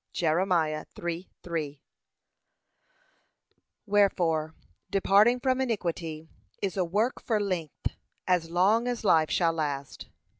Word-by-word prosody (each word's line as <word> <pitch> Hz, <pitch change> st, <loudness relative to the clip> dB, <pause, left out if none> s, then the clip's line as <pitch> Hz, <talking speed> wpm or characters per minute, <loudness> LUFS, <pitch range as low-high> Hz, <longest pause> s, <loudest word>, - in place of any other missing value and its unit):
(Jer. 160 Hz, -2 st, +1 dB
3:3) 165 Hz, -2 st, -2 dB, 2.1 s
Wherefore, 175 Hz, -6 st, +2 dB, 0.3 s
departing 205 Hz, +5 st, +4 dB
from 260 Hz, 0 st, +1 dB
iniquity 170 Hz, -9 st, -3 dB, 0.3 s
is 195 Hz, -3 st, -2 dB
a 190 Hz, -, +1 dB
work 210 Hz, +9 st, 0 dB
for 220 Hz, -3 st, 0 dB
length, 180 Hz, -7 st, -3 dB, 0.3 s
as 180 Hz, -3 st, +1 dB
long 200 Hz, +8 st, +3 dB
as 245 Hz, -2 st, -2 dB
life 160 Hz, -5 st, +4 dB
shall 165 Hz, -2 st, +2 dB
last. 145 Hz, -4 st, -4 dB
175 Hz, 100 wpm, -28 LUFS, 160-205 Hz, 2.1 s, departing